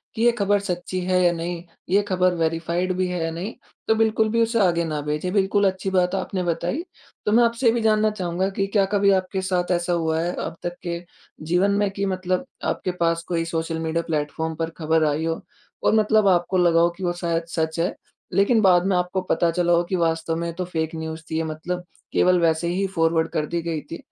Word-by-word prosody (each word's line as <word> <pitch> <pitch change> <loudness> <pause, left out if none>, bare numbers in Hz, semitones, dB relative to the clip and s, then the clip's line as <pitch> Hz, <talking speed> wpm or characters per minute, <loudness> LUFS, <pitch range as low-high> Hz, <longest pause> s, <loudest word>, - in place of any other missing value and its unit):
कि 220 - -3
ये 240 - +6
ख़बर 205 0 +2
सच्ची 185 -1 -3
है 185 0 +2
या 175 - +5
नहीं, 170 0 -4 0.3
ये 200 +2 +4
ख़बर 185 -1 +2
वेरिफ़ाइड 170 +2 0
भी 185 0 +1
है 180 -2 -2
या 165 - -1
नहीं 180 +7 -5 0.3
तो 220 - +4
बिल्कुल 220 0 +2
भी 230 +1 +2
उसे 230 0 0
आगे 170 -3 +3
न 150 -2 -2
भेजें। 150 +5 -2
बिल्कुल 200 0 +3
अच्छी 190 +1 -4
बात 180 0 +1
आपने 185 -1 -2
बताई। 175 - -1 0.4
तो 210 - +1
मैं 235 +2 +5
आपसे 235 +1 +1
ये - - +7
भी 235 - 0
जानना 215 -1 +3
चाहूँगा 185 -1 -2
कि 195 0 -1
क्या 200 -1 +2
कभी 200 0 +4
आपके 190 0 0
साथ 185 -1 -1
ऐसा 175 0 +1
हुआ 160 -1 0
है 175 +1 -1
अब - - -6
तक 175 0 -3
के 170 -1 -3 0.5
जीवन 180 +5 +2
में 205 -1 +2
कि 200 0 -2
मतलब 185 +4 -1 0.2
आपके 185 - -1
पास 170 0 +1
कोई 165 -1 -1
सोशल 165 0 -2
मीडिया 165 +1 -1
प्लेटफॉर्म 160 +1 -2
पर 165 +1 -2
ख़बर 160 0 +2
आई 150 +2 0
हो 165 0 -2 0.4
और - - +3
मतलब 215 -1 +4
आपको 180 0 +2
लगा 170 -2 +4
हो 170 - +4
कि 190 - -7
वो 175 -1 0
शायद 170 -1 -2
सच 160 0 -1
है 175 - 0 0.4
लेकिन 215 +3 +4
बाद 180 -2 +5
में 195 -1 +2
आपको 180 +1 -1
पता 170 - +2
चला 175 0 +2
हो 170 +1 +3
कि 190 - 0
वास्तव 165 -1 0
में 170 +1 -2
ये 170 - -4
तो 180 +2 -4
फ़ेक 160 -2 -3
न्यूज़ 160 0 -5
थी 160 - -2
ये 165 - 0
मतलब 170 +3 -4 0.3
केवल 180 -1 +4
वैसे 165 0 +2
ही 185 +3 0
फॉरवर्ड 165 0 +2
कर 150 - -1
दी 170 +2 -2
गई 165 -2 -3
थी। 165 - -4
175 Hz, 230 wpm, -23 LUFS, 165-195 Hz, 0.5 s, ये